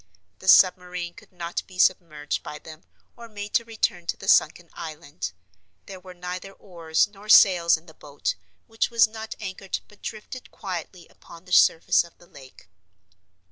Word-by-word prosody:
The 190 - -11
submarine 180 -2 +4
could 220 0 -17
not 175 -1 -4
be 185 - -14
submerged 165 -5 +1
by 150 - -8
them 155 +1 -13 0.3
or 235 -1 -12
made 205 -1 -8
to 235 - +3
return 220 -6 -2
to - - -1
the - - -10
sunken 165 +2 +3
island. 150 - -7 0.5
There 190 - -9
were 180 0 -13
neither 180 +2 -7
oars 170 -3 -1
nor 205 +1 -15
sails 175 -6 +7
in 160 - -17
the 160 - -15
boat, 145 -1 -4 0.3
which 225 0 -1
was 235 -1 +5
not 220 0 -8
anchored 190 0 -5
but 210 - -21
drifted 225 +4 -8
quietly 180 -2 -7
upon 170 +1 -16
the 180 - -15
surface 165 - +5
of 170 - -17
the 175 - -19
lake. 135 - -16
180 Hz, 170 wpm, -25 LUFS, 165-200 Hz, 0.5 s, sails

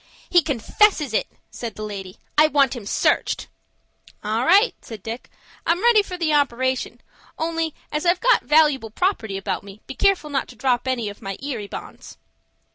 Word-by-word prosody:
"He 350 - +6
confesses 300 - +2
it," - - +1 0.2
said 235 -2 -6
the 215 - -6
lady; 195 -3 -7 0.2
"I 305 +1 +6
want 280 -4 +2
him 220 -5 -8
searched." - - +1 0.8
"All 220 +3 0
right," 400 - +5
said 220 -5 -10
Dick, 230 +2 -6 0.3
"I'm 345 +5 +1
ready 470 -3 +6
for 370 -3 -7
the 325 -3 0
operation, 260 -3 0 0.4
only, 325 -1 -2 0.2
as 300 - -2
I've 350 +1 +3
got - - +4
valooable 295 -6 +3
property 225 - -1
about 195 -1 -3
me, 200 +1 -12
be 270 - -7
careful 380 -4 +1
not 275 - -1
to - - -13
drop 255 -1 0
any 245 -4 -1
of 205 - -11
my 195 -2 -5
Erie 255 -7 -4
Bonds." - - -9
270 Hz, 175 wpm, -22 LUFS, 220-330 Hz, 0.8 s, He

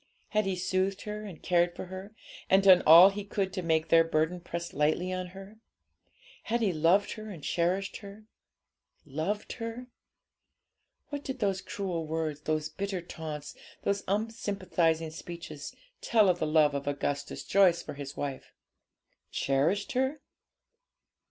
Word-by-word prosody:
Had 215 -2 +1
he 190 - 0
soothed 185 +2 -1
her 210 0 -5
and 185 -6 -10
cared 175 -1 +2
for - - -6
her, 190 +3 -9 0.3
and 190 +1 +5
done 185 -2 +8
all 170 +5 +10
he 205 +1 -5
could 195 -1 -2
to 185 - -2
make 160 -1 +1
their 165 0 +7
burden 165 +2 0
press 170 0 -5
lightly 155 +5 +1
on 185 0 -3
her? 195 +4 -12 0.9
Had 235 +1 0
he 200 -5 +2
loved 170 +6 +3
her 215 0 -7
and 170 -8 -9
cherished 180 +6 0
her? 205 +1 -11 0.8
Loved 160 +9 -3
her? 230 +2 -6 1.2
What 290 -1 -5
did 265 -1 -4
those 195 -5 0
cruel 175 -5 -4
words, 155 -2 -2
those 155 0 -1
bitter 195 +1 -4
taunts, 155 -4 -7 0.3
those 200 0 0
unsympathising 185 -6 0
speeches, 160 -3 -8 0.3
tell 215 -4 +4
of 175 -1 +1
the 155 - 0
love 150 -1 +4
of 140 0 -4
Augustus 145 0 -2
Joyce 190 -4 +4
for - - -7
his 140 0 -8
wife? 140 -2 -5 0.8
Cherished 160 - +1
her? 265 +3 0
180 Hz, 150 wpm, -29 LUFS, 160-200 Hz, 1.2 s, all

